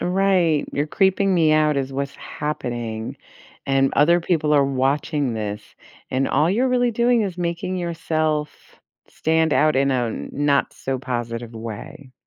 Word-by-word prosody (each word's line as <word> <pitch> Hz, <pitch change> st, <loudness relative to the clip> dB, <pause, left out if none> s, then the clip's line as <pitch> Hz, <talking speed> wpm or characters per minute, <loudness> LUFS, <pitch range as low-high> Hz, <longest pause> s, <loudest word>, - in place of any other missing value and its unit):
Right. 180 Hz, -4 st, +2 dB
You're 145 Hz, +2 st, -1 dB
creeping 190 Hz, +2 st, +2 dB
me 160 Hz, -3 st, +4 dB
out 155 Hz, -1 st, +3 dB
is 135 Hz, -1 st, -2 dB
what's 140 Hz, +1 st, -3 dB
happening, 120 Hz, -6 st, -5 dB, 0.5 s
and 135 Hz, 0 st, +2 dB
other 170 Hz, +4 st, +4 dB
people 155 Hz, -3 st, 0 dB
are 145 Hz, -2 st, +5 dB
watching 135 Hz, 0 st, 0 dB
this, 105 Hz, -1 st, -4 dB, 0.5 s
and 135 Hz, +1 st, 0 dB
all 155 Hz, +3 st, +2 dB
you're 245 Hz, +7 st, +2 dB
really 245 Hz, -1 st, +2 dB
doing 235 Hz, 0 st, +3 dB
is 185 Hz, -3 st, -3 dB
making 170 Hz, +1 st, -2 dB
yourself 155 Hz, -3 st, -1 dB, 0.6 s
stand 160 Hz, 0 st, +1 dB
out 155 Hz, -1 st, +3 dB
in 135 Hz, +1 st, +2 dB
a 125 Hz, -2 st, +1 dB
n 110 Hz, -, -5 dB
not 145 Hz, -1 st, +1 dB
so 130 Hz, -1 st, -4 dB
positive 120 Hz, -2 st, -4 dB
way. 115 Hz, +4 st, -8 dB
150 Hz, 150 wpm, -22 LUFS, 130-170 Hz, 0.6 s, are